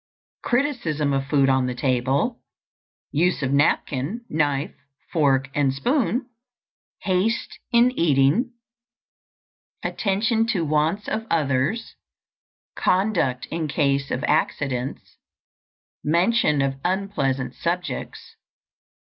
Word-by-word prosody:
_ - - -72
Criticism 240 - 0
of 135 0 -1
food 140 -2 +3
on 130 -1 +2
the 125 - -3
table. 135 - 0 0.7
Use 165 0 +1
of 130 - 0
napkin, 145 - 0
knife, 145 -2 0 0.4
fork, 135 -4 +2
and 140 -2 +2
spoon. 245 - 0 0.8
Haste 200 +4 0
in 240 +1 +5
eating. 165 - +2 1.3
Attention 225 +3 0
to 190 -8 0
wants 155 +7 0
of 220 +1 -3
others. 150 - 0 0.8
Conduct 180 -10 +1
in 165 -1 -2
case 140 -2 0
of 125 - -2
accidents. 140 -4 -1 0.9
_Mention 170 -3 +2
of 135 0 -5
unpleasant 175 -9 -1
subjects. 180 +1 -4
155 Hz, 95 wpm, -23 LUFS, 135-205 Hz, 1.3 s, in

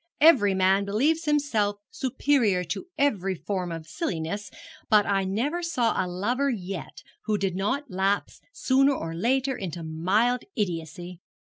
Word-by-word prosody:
Every 245 -11 +6
man 190 +1 +3
believes 280 +12 +1
himself 280 -9 +1 0.2
superior 260 -8 +1
to 175 - -5
every 195 -9 +1
form 180 0 -3
of 165 -1 -6
silliness, 180 - -3 0.4
but 210 -3 +5
I 195 -1 +1
never 250 - -1
saw 255 -9 +1
a - - -4
lover 240 +10 0
yet 195 - -5 0.2
who 215 -1 +1
did 195 -2 -1
not 220 +9 -2
lapse 195 +2 -1
sooner 275 - +3
or 165 -6 -4
later 260 +9 +1
into 170 -3 -5
mild 195 +10 +1
idiocy.' 175 - -4
205 Hz, 140 wpm, -26 LUFS, 180-265 Hz, 0.4 s, Every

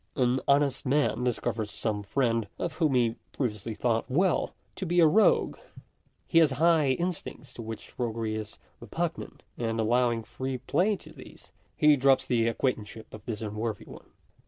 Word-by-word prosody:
An 125 0 +2
honest 140 -1 +3
man 140 -2 +1
discovers 115 -3 -1
some 105 0 -2
friend, 115 +1 0
of 170 - -3
whom 155 -6 +2
he 120 -2 +4
had 115 - -14
pre 125 -5 0
viously 105 +1 -7
thought 115 0 0
well, 175 +6 +1 0.2
to 190 - -3
be 175 +1 +2
a 165 - +7
rogue. 205 +8 +4 0.7
He 165 - +4
has 160 -3 +5
certain 140 +3 -3
high 160 -5 +4
instincts 165 -5 -4
to - - -8
which 110 -1 -8
roguery 115 -2 -2
is 110 -1 -6 0.2
repugnant; - - -4 0.2
and 115 -1 -1
allowing 120 +1 +2
free 130 +3 -4
play 200 - +1
to 155 -4 -13
these, 130 - -14 0.3
he 150 -1 +6
drops 135 0 +4
the 115 -2 +1
acquaintanceship 115 -2 -3
of 110 - -10
this 110 -2 -4
unworthy 105 0 -4
one. - - -13
125 Hz, 175 wpm, -28 LUFS, 115-145 Hz, 0.7 s, a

